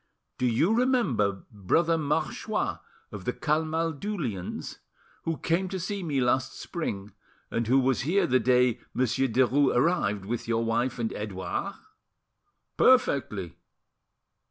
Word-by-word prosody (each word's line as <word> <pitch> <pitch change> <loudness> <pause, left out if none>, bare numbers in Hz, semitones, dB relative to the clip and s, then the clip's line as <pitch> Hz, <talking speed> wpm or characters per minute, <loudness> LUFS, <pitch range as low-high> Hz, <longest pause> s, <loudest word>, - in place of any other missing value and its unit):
"Do 125 - +2
you 140 - +2
remember 185 - +1
Brother 160 - +1
Marchois 150 -2 -1 0.3
of 100 -3 -8
the 125 - 0
Camaldulians, 160 - -2 0.5
who 165 -1 -1
came 180 +5 0
to 190 - -3
see 200 +3 -3
me 150 -6 -1
last 130 +1 0
spring, 105 - -5 0.4
and 115 -1 -1
who 130 +3 +4
was 130 -1 +1
here 175 +10 +2
the 130 +1 +3
day 125 -2 +3 0.2
Monsieur 130 +1 +1
Derues 130 +3 +3
arrived, 115 - +1
with 115 +3 -3
your 115 0 +1
wife 120 +2 0
and 115 -2 -2
Edouard?" 105 - -4 1.0
"Perfectly. 130 - +2
130 Hz, 125 wpm, -27 LUFS, 115-165 Hz, 1.0 s, who